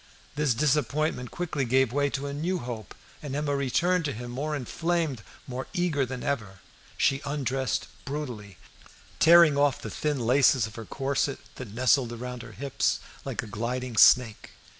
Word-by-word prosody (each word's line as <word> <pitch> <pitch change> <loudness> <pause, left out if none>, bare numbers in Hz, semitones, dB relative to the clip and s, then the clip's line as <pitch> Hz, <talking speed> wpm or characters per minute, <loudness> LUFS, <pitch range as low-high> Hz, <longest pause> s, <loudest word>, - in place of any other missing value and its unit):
This 145 -4 +1
disappointment 150 -1 0
quickly 160 -5 -2
gave 130 0 +2
way 145 0 +2
to 135 +1 -3
a 140 - -4
new 170 +6 -1
hope, 115 - -7 0.3
and 140 -2 -5
Emma 145 -1 0
returned 165 +7 +1
to 140 - -1
him 120 +2 -7
more 150 +5 -2
inflamed, 160 -1 -1 0.2
more 130 0 -5
eager 170 -8 0
than 125 0 -6
ever. 105 -9 -3 0.4
She 135 0 +2
undressed 135 -3 -1 0.2
brutally, 125 - -6 0.6
tearing 165 -3 +7
off 145 -1 +3
the - - -7
thin 150 -2 -1
laces 125 0 +4
of 110 - -9
her 110 +2 -8
corset 135 +2 -1 0.2
that 115 -5 -8
nestled 125 0 +3
around 125 +1 -6
her 115 -2 -11
hips 135 +6 -1 0.3
like - - -3
a - - -7
gliding 120 +3 -4
snake. 115 0 +5
135 Hz, 160 wpm, -27 LUFS, 120-145 Hz, 0.6 s, tearing